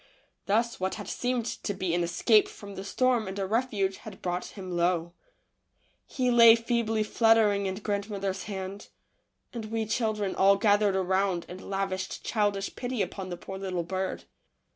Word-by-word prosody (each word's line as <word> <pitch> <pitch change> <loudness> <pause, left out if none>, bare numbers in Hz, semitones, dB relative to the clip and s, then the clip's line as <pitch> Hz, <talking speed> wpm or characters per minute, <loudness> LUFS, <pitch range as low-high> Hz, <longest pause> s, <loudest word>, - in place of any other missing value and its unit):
Thus 230 +4 +1
what 190 +1 -1
had 205 - -7
seemed 245 -2 -1
to 205 -3 -4
be 185 -3 -1
an 175 - +1
escape 210 +5 +4
from 200 -1 -10
the 190 - -6
storm 245 +2 +1
and 190 +1 -5
a 195 - -1
refuge 205 -3 0
had 210 -3 -11
brought 180 0 -2
him 185 -2 -6
low. 170 -1 +1 0.9
He 250 -2 0
lay 230 -1 +9
feebly 230 -2 0
fluttering 215 -3 +3
in 190 - -2
grandmother's 200 -1 -3
hand, 195 -1 -6 0.7
and 230 -3 -5
we 225 0 -2
children 215 -3 -1
all 195 +1 +5
gathered 205 -1 +3
around 190 -1 +1
and 185 +1 -9
lavished 195 -1 -3
childish 205 -3 0
pity 245 -4 -2
upon 185 +1 -6
the 175 - -5
poor 190 +2 -8
little 185 -3 -2
bird. 190 +2 -3
200 Hz, 165 wpm, -28 LUFS, 190-220 Hz, 0.9 s, lay